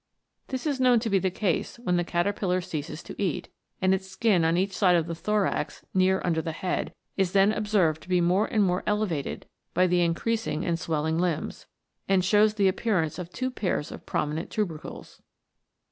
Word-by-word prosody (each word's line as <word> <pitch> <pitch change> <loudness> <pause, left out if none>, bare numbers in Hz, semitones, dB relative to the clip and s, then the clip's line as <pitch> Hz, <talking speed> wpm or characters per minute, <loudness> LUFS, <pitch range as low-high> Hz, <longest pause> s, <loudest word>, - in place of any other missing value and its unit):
This 260 +1 -4
is 285 -3 0
known 250 -2 +5
to 225 -2 -2
be 195 - +4
the 190 - +1
case 185 +2 -1
when 220 -7 -1
the 175 - +2
caterpillar 180 +1 0
ceases 160 -3 -5
to - - -8
eat, 185 -6 -1 0.3
and 190 0 +4
its 190 0 -2
skin 190 -2 +2
on 165 +1 +2
each 190 +1 0
side 180 -3 +4
of 165 -2 +2
the 170 - -4
thorax, 210 +4 -1
near 190 0 +3
under 165 -2 +1
the 165 - -3
head, 180 +3 -3 0.2
is 190 -2 +1
then 200 +1 +5
observed 205 -8 +1
to - - -15
be 180 -1 +3
more 180 +5 +2
and 215 -2 +2
more 180 -1 +1
elevated 210 -9 -1 0.3
by 180 +2 +4
the 180 -1 +2
increasing 175 +2 0
and 170 -1 0
swelling 160 -1 -1
limbs, 175 -3 -2 0.4
and 190 -2 +3
shows 210 +2 +4
the 200 -2 +3
appearance 185 -5 0
of 175 -2 -6
two 255 +7 -3
pairs 185 -10 -2
of - - -10
prominent 150 +3 -2
tubercles." 175 -8 -5
185 Hz, 190 wpm, -27 LUFS, 170-210 Hz, 0.4 s, known